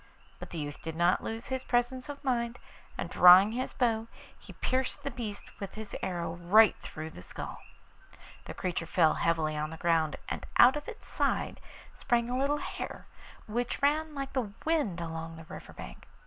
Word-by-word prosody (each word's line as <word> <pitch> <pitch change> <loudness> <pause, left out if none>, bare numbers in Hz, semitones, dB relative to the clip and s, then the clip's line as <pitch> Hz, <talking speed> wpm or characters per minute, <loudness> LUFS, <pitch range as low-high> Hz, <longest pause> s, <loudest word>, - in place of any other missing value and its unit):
But - - -8
the 170 - -7
youth 145 -1 -5
did 160 -1 -5
not 175 +2 +3
lose 225 +3 -5
his 260 -1 -2
presence 250 +2 0
of 285 0 -7
mind, 240 -3 0 0.4
and - - -2
drawing 185 +4 +8
his 255 +3 -2
bow 225 -3 +1 0.3
he - - -13
pierced 260 0 -1
the 280 - -3
beast 225 -5 -6
with 200 - -6
his 215 -1 -7
arrow 170 -3 -2
right 200 +5 +6
through 155 +1 -7
the 90 - -11
skull. 90 - -7 0.9
The - - -7
creature 170 -2 -2
fell 165 -2 +4
heavily 160 -2 +1
on 150 0 -2
the 160 - -8
ground, 165 -2 +2
and - - -4
out 255 +3 +8
of 295 0 -5
its 455 - -9
side - - -1 0.3
sprang 240 0 0
a 250 - 0
little 285 +2 +2
hare, - - -6 0.4
which 240 +3 -2
ran 305 +1 +2
like 275 -1 -4
the 245 -6 -1
wind 295 - +1
along 165 -1 -5
the 160 0 -11
river 185 - -9
bank. - - -10
220 Hz, 185 wpm, -30 LUFS, 165-255 Hz, 0.9 s, drawing